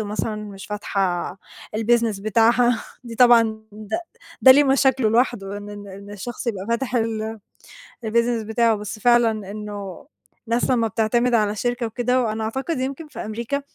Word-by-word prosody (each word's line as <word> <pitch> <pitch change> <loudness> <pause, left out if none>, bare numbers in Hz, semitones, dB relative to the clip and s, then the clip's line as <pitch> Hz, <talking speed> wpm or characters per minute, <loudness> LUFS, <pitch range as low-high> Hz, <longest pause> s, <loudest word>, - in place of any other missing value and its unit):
ومثلًا 215 +1 -3
مش 205 -2 -8
فاتحة 195 -4 -2 0.4
الBusiness 225 -2 +1
بتاعها، 230 +2 +3 0.2
دي 235 -1 -7
طبعًا 240 -1 +7 0.3
د 210 0 -11 0.5
ده 260 - +9
ليه 290 +2 +5
مشاكله 265 -3 +3
لوحده، 220 -4 0
إن 205 0 -9
ال 205 -1 -9
إن 200 +1 -10
الشخص 240 +5 -7
يبقى 195 -4 -3
فاتح 245 +2 -1
ال 225 -1 -2 0.7
الBusiness 235 0 +1
بتاعه، 230 0 +2
بس 210 +1 -6
فعلًا 240 0 +4 0.2
إنّه 205 +1 -7 0.4
الناس 235 +2 0
لمّا 230 -3 +2
بتعتمد 235 +3 +1
على 210 -2 +2
شركة 245 +2 -1
وكده، 250 +3 0
وأنا 220 -1 -2
أعتقد 265 +7 -2
يمكن 275 +4 -4
في 295 - -11
أمريكا، 235 +6 -3
225 Hz, 155 wpm, -22 LUFS, 210-245 Hz, 0.7 s, ده